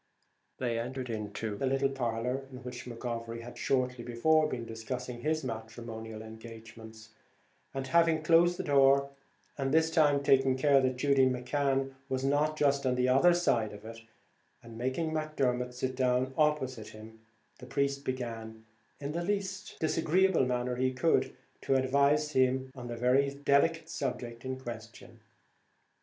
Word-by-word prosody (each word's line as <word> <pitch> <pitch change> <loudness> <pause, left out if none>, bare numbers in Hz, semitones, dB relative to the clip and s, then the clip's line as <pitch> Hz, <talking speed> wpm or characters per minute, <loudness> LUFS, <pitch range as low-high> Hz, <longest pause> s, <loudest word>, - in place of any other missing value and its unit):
They 120 -3 -1
entered 130 +2 -4
the 105 +1 -4
little 135 +1 +1
parlour 125 +1 -2
in 130 0 -10
which 125 -1 -7
McGovery 115 -1 -5
had 120 +1 -10
shortly 125 -2 -1
before 155 +7 +2
been 120 -4 -4
discussing 120 +2 -6
his 155 +2 0
matrimonial 110 -2 -7
engagements, 110 0 -11 0.6
and 135 -1 -4
having 165 +2 +3
closed 170 +2 +4
the - - -3
door, 140 -1 +4 0.5
and, 135 -1 0
this 160 +1 +3
time, 145 -4 +3
taking 135 -1 +4
care 140 0 +4
that 130 -1 +1
Judy 135 0 +4
McCan 135 +1 0 0.2
was 130 0 -1
not 150 +2 +1
just 140 -2 +2
on 130 -1 +1
the 125 0 +1
other 155 +7 +5
side 115 -12 +1
of 105 +1 -11
it, 115 0 -8 0.6
and 115 -1 -11
making 130 +7 -2
Macdermot 130 -6 -1
sit 130 +1 -2
down 130 0 +1
opposite 130 -7 0
to - - -12
him, 110 +1 -12 0.4
the 125 - -11
priest 140 +1 -1
began, 115 -4 -5 0.3
in 140 0 -4
the 170 +2 -2
least 195 0 -3
disagreeable 165 -1 +2
manner 125 0 -1
he 130 +1 +1
could, 145 +6 +1 0.3
to 135 - +1
advise 140 +3 +2
him 130 -1 +1
on 125 -3 -8
the 120 -1 -5
very 130 +4 +3
delicate 145 +3 +2
subject 120 -5 -4
in 130 0 -4
question. 115 -2 -9
130 Hz, 150 wpm, -30 LUFS, 120-140 Hz, 0.6 s, other